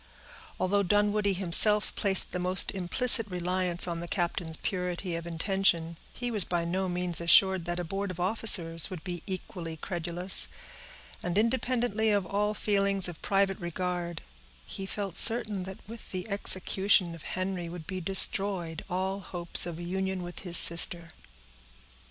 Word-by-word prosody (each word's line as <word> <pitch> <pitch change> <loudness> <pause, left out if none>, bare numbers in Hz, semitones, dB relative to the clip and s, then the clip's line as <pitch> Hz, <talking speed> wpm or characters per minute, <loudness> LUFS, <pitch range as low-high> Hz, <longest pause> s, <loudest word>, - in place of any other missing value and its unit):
Although 200 +2 0
Dunwoodie 205 +1 0
himself 200 +4 +6
placed 195 -3 0
the 180 - -5
most 185 +1 0
implicit 220 +5 +1
reliance 180 0 -2
on 170 -1 -5
the 170 - -8
captain's 170 -3 -1
purity 180 -1 -4
of 170 0 -7
intention, 170 -1 -1 0.2
he 245 -1 -6
was 210 -4 +3
by 170 0 -3
no 185 +2 -3
means 175 -1 -2
assured 190 +1 +3
that 175 0 -4
a - - -4
board 195 +4 -5
of 180 -1 -9
officers 175 -4 +5
would 180 -5 -9
be 175 -2 -7
equally 175 -3 -7
credulous; 175 +2 +1 0.7
and, 175 +1 -4
independently 230 -1 -1
of 205 -3 0
all 210 +3 -2
feelings 200 -2 0
of 175 -2 -10
private 195 -1 -1
regard, 175 -1 -5 0.4
he 195 - -8
felt 195 -3 -6
certain 215 -5 +3
that 190 0 -9
with 230 +1 -12
the 185 +2 -6
execution 190 -2 +1
of 165 - -12 0.2
Henry 185 -2 -4
would 170 -2 -10
be 185 +1 -6
destroyed 190 -2 +1
all 190 +2 -3
hopes 175 -2 +4
of 170 -2 -7
a 175 - -9
union 190 +1 -4
with 175 0 -9
his 175 -3 -1
sister. 170 0 +2
185 Hz, 155 wpm, -27 LUFS, 175-200 Hz, 0.7 s, himself